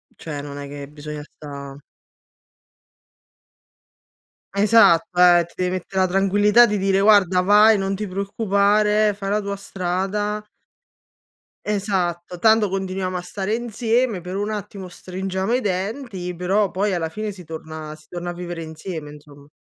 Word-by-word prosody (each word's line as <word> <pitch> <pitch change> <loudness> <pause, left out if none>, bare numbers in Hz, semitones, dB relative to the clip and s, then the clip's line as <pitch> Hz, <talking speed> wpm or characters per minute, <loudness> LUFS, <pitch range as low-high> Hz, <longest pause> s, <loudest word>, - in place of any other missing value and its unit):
Cioè 150 -3 -6
non 145 0 -8
è 140 0 -6
che 140 0 -8
bisogna 150 0 -8
sta 140 -2 -10 2.7
Esatto, 200 -5 +4
ehm, 175 -1 +6
ti 170 - -21
deve 180 0 0
mettere 190 +1 -2
la 185 - +3
tranquillità 205 +5 +4
di 210 -3 -1
dire 195 0 +2
guarda 200 -3 +5
vai, 210 +3 +6
non 195 0 -1
ti 210 +1 -4
preoccupare, 205 +2 +2
fai 195 -1 -5
la 210 +1 +1
tua 200 0 -4
strada 195 +3 -2 1.2
Esatto, 180 -4 -2
tanto 220 0 +4
continuiamo 190 -1 -3
a - - -4
stare 190 +3 -3
insieme, 230 -2 0
per 180 +2 -5
un 205 +1 -2
attimo 200 -2 -6
stringiamo 190 +3 -4
i 250 - +3
denti, 195 -1 -3
però 190 +3 +1
poi 200 +1 0
alla 165 -2 -1
fine 210 +3 -5
si 185 - -12
torna 160 -1 -8
si 155 - -20
torna 175 +1 -5
a 175 - -4
vivere 175 -1 -6
insieme 160 -1 -7
insom 145 -1 -15
190 Hz, 145 wpm, -22 LUFS, 175-205 Hz, 2.7 s, ehm